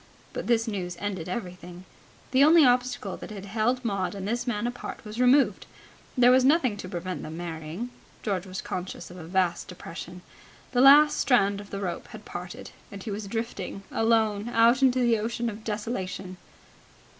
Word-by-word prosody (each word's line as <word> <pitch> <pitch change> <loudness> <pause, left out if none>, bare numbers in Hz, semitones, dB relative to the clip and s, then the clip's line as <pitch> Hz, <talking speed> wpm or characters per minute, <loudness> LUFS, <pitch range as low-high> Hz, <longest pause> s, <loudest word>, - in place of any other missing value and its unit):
But - - -5
this 230 -1 +2
news 180 -5 -4
ended 190 -4 -4
everything. 180 -3 -6 0.5
The 265 +1 +5
only 315 0 +7
obstacle 245 -5 +1
that - - -9
had 200 -2 -8
held 235 +5 0
Maud 195 -3 -1
and 195 0 -5
this 240 +3 -2
man 215 -2 -1
apart 245 -1 -6
was 215 +2 -7
removed. 250 -5 +4 0.5
There 245 0 +7
was 255 0 +5
nothing 265 -5 +3
to 185 - -7
prevent 180 0 -4
them 160 +1 -7
marrying. 170 +6 -5 0.3
George 195 -3 -2
was 185 0 -5
conscious 180 0 -5
of 180 - -11
a 165 - -8
vast 180 0 0
depression. 180 0 -9 0.5
The 250 -1 +3
last 290 +3 +8
strand 205 -6 +3
of 200 - -13
the 200 - -5
rope 175 -3 -4
had 215 -2 -11
parted, 175 0 -8 0.2
and 200 -1 -8
he 220 - -5
was 205 0 -5
drifting 200 -3 -4
alone 225 -1 +2
out 235 +3 +4
into 260 -1 +4
the 235 -3 +3
ocean 235 +2 -2
of 215 +1 -10
desolation. 195 -4 -4
210 Hz, 180 wpm, -27 LUFS, 185-240 Hz, 0.5 s, last